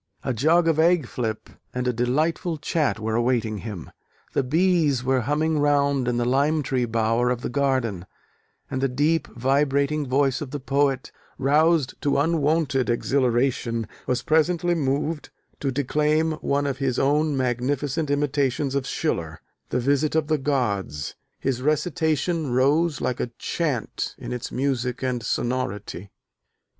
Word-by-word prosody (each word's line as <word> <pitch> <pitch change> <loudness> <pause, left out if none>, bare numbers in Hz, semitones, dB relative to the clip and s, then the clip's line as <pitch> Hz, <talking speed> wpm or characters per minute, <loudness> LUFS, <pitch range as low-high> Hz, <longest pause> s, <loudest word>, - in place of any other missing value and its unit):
A 130 - -1
jug 160 +8 +3
of 160 -1 +2
egg 170 -2 +4
flip 115 -2 -4 0.3
and 125 0 -1
a 125 - +1
delightful 155 +8 0
chat 150 -4 0
were 110 0 -2
awaiting 115 -2 0
him: 105 -6 -7 0.4
the - - +2
bees 155 -2 +2
were 130 0 +2
humming 150 +5 0
round 140 -3 +2
in 120 -1 +1
the 120 - 0
"lime 145 +5 +2
tree 125 -1 0
bower" 115 +1 +1
of 125 -1 -1
the - - -4
garden: 125 -9 0 0.6
and 130 - -2
the 135 - +3
deep, 145 +4 +1
vibrating 140 +3 +1
voice 135 0 +2
of 145 - -5
the 145 +1 -4
poet, 135 0 0 0.3
roused 150 +1 +3
to 145 - +1
unwonted 150 -3 +1
exhilaration, 120 -2 +1 0.2
was 125 -1 0
presently 170 +2 +2
moved 150 0 -1 0.3
to 140 - -1
declaim 150 +4 +1
one 140 +1 0
of 140 -1 -2
his 135 -3 0
own 145 +1 +2
magnificent 135 +4 -1
imitations 140 -1 0
from 140 - +1
Schiller, 85 - -2 0.3
The - - 0
Visit 145 +4 +1
of 160 -2 +2
the 155 0 0
Gods. 100 - -1 0.3
His 130 -2 -1
recitation 160 +1 0
rose 145 +4 +2
like 125 - -1
a - - -1
chant 145 -9 -2
in - - -6
its 125 - -5
music 130 -2 -1
and 125 -2 -1
sonority. 105 -7 -3
135 Hz, 150 wpm, -24 LUFS, 125-150 Hz, 0.6 s, egg